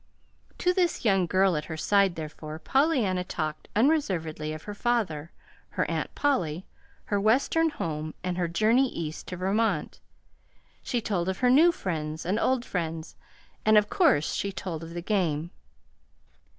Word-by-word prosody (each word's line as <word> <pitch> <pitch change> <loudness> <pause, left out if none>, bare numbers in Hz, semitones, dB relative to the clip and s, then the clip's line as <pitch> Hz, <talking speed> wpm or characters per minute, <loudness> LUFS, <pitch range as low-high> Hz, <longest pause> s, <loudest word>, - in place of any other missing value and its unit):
To 360 - +2
this 355 -8 0
young 195 -4 +3
girl 185 0 +3
at 150 - -2
her 160 - -6
side, 200 +1 +3
therefore, 155 0 -7
Pollyanna 240 - +1
talked 155 -4 -4
unreservedly 185 - +1
of 155 0 -7
her 205 - -6
father, 200 -9 -1 0.4
her - - -1
Aunt - - -3
Polly, 185 - 0 0.4
her 205 -1 0
Western 275 +9 +3
home, 155 - -4
and 180 -1 -2
her 175 -1 0
journey 220 +10 +3
East 160 -5 -6
to 180 - -5
Vermont. 205 +5 0 0.8
She 240 - -2
told 190 -5 -1
of 190 +6 -4
new 280 +8 +6
friends 160 - -4
and 195 +5 0
old 255 0 +1
friends, 165 -3 -4 0.5
and 215 0 +5
of 210 0 +3
course 145 +1 +3
she 200 - -2
told 170 -4 -5
of 165 +1 -9
the 175 - -4
game. 170 -5 0
185 Hz, 150 wpm, -27 LUFS, 160-225 Hz, 0.8 s, new